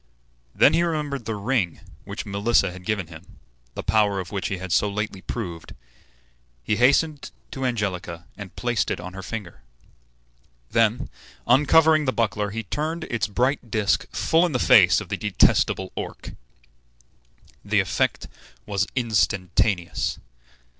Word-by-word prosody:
Then 145 Hz, -, +5 dB
he 165 Hz, -, +3 dB
remembered 150 Hz, -7 st, -2 dB
the 110 Hz, -, -3 dB
ring 100 Hz, -4 st, -1 dB, 0.3 s
which -, -, -6 dB
Melissa 100 Hz, -1 st, +1 dB
had 90 Hz, 0 st, -11 dB
given 105 Hz, -4 st, -1 dB
him, 80 Hz, +1 st, -14 dB, 0.4 s
the -, -, -5 dB
power 100 Hz, -1 st, +2 dB
of 90 Hz, -2 st, -6 dB
which 100 Hz, -2 st, -2 dB
he 100 Hz, -, -3 dB
had 95 Hz, 0 st, -7 dB
so 105 Hz, -, +3 dB
lately 100 Hz, -2 st, -4 dB
proved. 90 Hz, -7 st, -6 dB, 0.9 s
He 105 Hz, -, 0 dB
hastened 140 Hz, +4 st, +2 dB, 0.2 s
to 135 Hz, -, -5 dB
Angelica 90 Hz, -7 st, -3 dB
and 100 Hz, -3 st, -10 dB
placed 120 Hz, -1 st, -1 dB
it -, -, -2 dB
on 90 Hz, +1 st, -8 dB
her 95 Hz, -, -7 dB
finger. 100 Hz, -3 st, -7 dB, 1.1 s
Then, 115 Hz, +1 st, +2 dB, 0.4 s
uncovering 150 Hz, +4 st, +5 dB
the 130 Hz, -, 0 dB
buckler, 105 Hz, -2 st, 0 dB
he 115 Hz, +2 st, -4 dB
turned 155 Hz, -, -3 dB
its 120 Hz, -2 st, 0 dB
bright 125 Hz, +4 st, 0 dB
disk 105 Hz, -1 st, +1 dB
full 165 Hz, +2 st, +2 dB
in 175 Hz, -4 st, 0 dB
the -, -, +2 dB
face 105 Hz, -7 st, +6 dB
of 100 Hz, -, -10 dB
the -, -, -2 dB
detestable 95 Hz, -2 st, +2 dB
Orc. -, -, -6 dB, 1.3 s
The -, -, +1 dB
effect -, -, 0 dB, 0.4 s
was 100 Hz, -1 st, -1 dB
instantaneous. 100 Hz, -5 st, 0 dB
105 Hz, 145 wpm, -24 LUFS, 95-125 Hz, 1.3 s, face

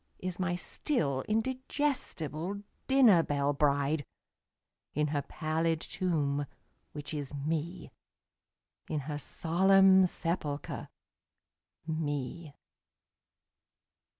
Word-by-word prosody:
Is 185 Hz, -1 st, -4 dB
n^y 180 Hz, -1 st, 0 dB
still 150 Hz, -, -1 dB
indigestible 220 Hz, -, -2 dB, 0.2 s
dinner 250 Hz, -10 st, +6 dB
belle 145 Hz, -2 st, 0 dB
bride, 145 Hz, +1 st, +1 dB, 0.9 s
In 150 Hz, +1 st, +2 dB
her 145 Hz, -1 st, 0 dB
pallid 160 Hz, +1 st, -1 dB
tomb, 145 Hz, -6 st, -1 dB, 0.4 s
which 145 Hz, 0 st, -6 dB
is 145 Hz, -3 st, -4 dB
Me, 160 Hz, +5 st, -3 dB, 1.0 s
In 155 Hz, -2 st, -1 dB
her 145 Hz, +1 st, -4 dB
solemn 190 Hz, +4 st, +5 dB
sepulcher, 165 Hz, -5 st, -3 dB, 1.0 s
Me. 150 Hz, -1 st, -3 dB
160 Hz, 80 wpm, -31 LUFS, 145-185 Hz, 1.0 s, dinner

